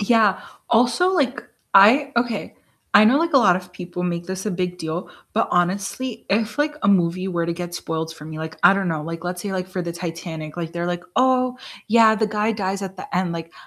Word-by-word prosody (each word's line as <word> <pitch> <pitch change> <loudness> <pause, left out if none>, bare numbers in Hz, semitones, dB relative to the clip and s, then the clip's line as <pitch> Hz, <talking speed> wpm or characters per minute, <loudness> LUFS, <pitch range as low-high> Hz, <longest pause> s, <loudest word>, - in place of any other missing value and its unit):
Yeah. 210 -2 +3 0.3
Also, 245 +11 +3
like 275 -7 0 0.3
I 245 +9 +7
Okay, 235 -2 -1 0.4
I 205 - +8
know, 250 +6 +5
like, 335 -1 0
a - - +8
lot 190 -8 +5
of 180 -1 -9
people 180 -1 -6
make 175 -1 -2
this 190 +2 -5
a - - 0
big 180 -1 -3
deal, 160 +2 -4 0.2
but 225 - +1
honestly, 200 +7 -1
if, 215 +2 0
like, 295 +1 0
a - - +2
movie 185 -1 +2
were 170 -2 -1
to 170 - -1
get 175 0 -6
spoiled 160 -1 -4
for 150 - -12
me, 155 0 -8
like, 160 0 -6
I - - +8
don't 195 -2 -1
know, 160 -2 -2
like 165 +1 -6
let's 180 0 -4
say 200 - -4
like 185 -1 -3
for 185 -1 -4
the 170 -1 -4
Titanic, 165 -2 -6
like 165 -1 -4
they're 170 0 -3
like, 175 0 -3
"Oh, 255 0 +2 0.3
yeah, 220 0 +6
the 220 0 +1
guy 210 +1 0
dies 195 -2 -2
at 190 0 -6
the - - -7
end," 180 -2 0
like, 165 0 -6
185 Hz, 230 wpm, -22 LUFS, 170-220 Hz, 0.4 s, I